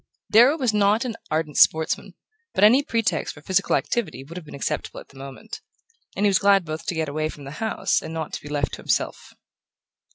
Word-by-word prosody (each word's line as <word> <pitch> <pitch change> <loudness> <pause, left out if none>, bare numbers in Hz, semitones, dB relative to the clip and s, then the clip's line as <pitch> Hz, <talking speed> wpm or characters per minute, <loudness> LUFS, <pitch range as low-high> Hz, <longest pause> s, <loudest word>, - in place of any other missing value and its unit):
Darrow 245 +8 +6
was 250 -7 0
not 210 +4 +2
an 235 -3 -3
ardent 155 -1 -2
sportsman, 160 0 +3 0.4
but 195 - +2
any 240 +6 +7
pretext 225 - -1
for 145 - -15
physical 190 +2 +1
activity 195 - -2
would 160 +5 -12
have 175 -4 -8
been - - -9
acceptable 140 - -3
at - - -14
the 135 - -15
moment; 140 - -9 0.5
and 205 - 0
he - - +6
was 195 -2 +3
glad 200 -2 +4
both 155 0 -6
to 175 - -1
get 160 -1 -1
away 155 +2 -2
from 145 - -10
the 140 - -8
house 220 -4 0
and 160 - -7
not 160 -1 -5
to - - -4
be 145 - -10
left 145 -2 -1
to - - -4
himself. - - -2
180 Hz, 220 wpm, -23 LUFS, 155-215 Hz, 0.5 s, any